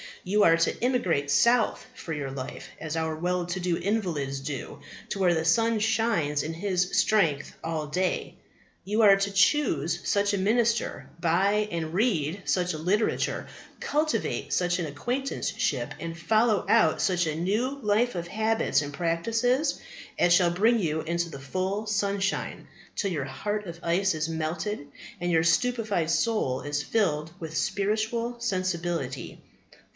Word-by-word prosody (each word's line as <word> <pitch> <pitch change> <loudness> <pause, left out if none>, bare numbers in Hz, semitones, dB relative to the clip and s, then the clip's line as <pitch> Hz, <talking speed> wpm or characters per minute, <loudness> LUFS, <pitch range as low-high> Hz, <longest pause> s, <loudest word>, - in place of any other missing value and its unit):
You 205 +3 +2
are 165 0 +6
to 165 +7 0
emigrate 185 - +1
south 235 +8 +3
for 160 - -6
your 145 -3 -3
life, 130 -1 -7
as 155 0 -4
our 160 -1 -1
well 180 +2 -1
to 175 +2 -3
do 175 -1 0
invalids 170 -10 -1
do, 135 -1 -6 0.3
to 195 - -3
where 180 -2 +4
the 160 -1 -1
sun 225 +6 +3
shines 215 -10 +1
in 160 +3 -4
his 180 +1 -1
strength 165 -10 +2
all 160 -2 -2
the 150 - -12
day. 185 0 -1 0.5
You 210 +3 +1
are 200 -2 +8
to 200 0 -1
choose 185 - +2
such 205 0 +2
a 200 - 0
minister, 230 +4 +1
buy 195 +6 +2
and 160 -1 -3
read 190 - 0
such 180 -1 +1
a 155 - -5
literature, 195 +7 0 0.3
cultivate 310 +1 -1
such 180 0 +1
an 170 - -2
acquaintanceship, 145 - -2
and 165 +1 -5
follow 215 +3 +2
out 160 -1 +4
such 175 -3 +1
a 155 - -1
new 220 - -1
life 220 +2 +1
of 170 -1 -3
habits 220 -3 +1
and 145 0 -6
practices 230 - 0 0.4
as 175 - +4
shall 175 -1 +4
bring 225 +6 +3
you 160 -4 -1
into 170 +1 -2
the 140 -4 -8
full 185 +9 -2
sunshine, 200 -2 -1 0.3
till 200 -3 -1
your 145 -6 -2
heart 210 +9 -3
of 170 -2 -8
ice 180 +1 +1
is 155 +1 -2
melted, 160 +2 -3 0.3
and 175 0 -1
your 160 -1 +3
stupefied 205 -1 +1
soul 170 - +1
is 145 0 -2
filled 160 -8 0
with 160 -1 -6
spiritual 220 +4 -1
sensibility. 175 - -2
180 Hz, 155 wpm, -27 LUFS, 160-215 Hz, 0.5 s, are